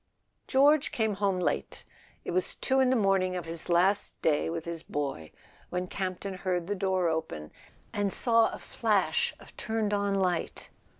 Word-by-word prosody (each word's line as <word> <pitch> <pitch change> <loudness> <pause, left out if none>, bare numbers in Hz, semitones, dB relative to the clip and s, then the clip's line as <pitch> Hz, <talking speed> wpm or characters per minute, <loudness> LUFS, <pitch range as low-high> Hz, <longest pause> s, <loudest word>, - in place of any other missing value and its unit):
George 285 +2 +4
came 220 -2 0
home 200 -2 +1
late. 180 - -2 0.4
It - - -3
was 185 +1 0
two 265 0 +1
in 260 -1 +4
the 260 - +3
morning 195 -4 +2
of 175 -2 -4
his 165 +1 -5
last 185 +4 +2
day 150 -1 +2
with 165 -1 -4
his 170 -1 -5
boy 135 - -4 0.4
when 180 0 -2
Campton 190 +1 -4
heard 180 -2 -2
the 205 - -1
door 190 -2 +1
open, 160 - -3 0.4
and 205 -1 0
saw 230 0 +3
a - - -6
flash - - 0
of - - -16
turned 220 -2 -1
on 200 -1 +1
light. 180 -3 -1
185 Hz, 170 wpm, -29 LUFS, 170-205 Hz, 0.4 s, George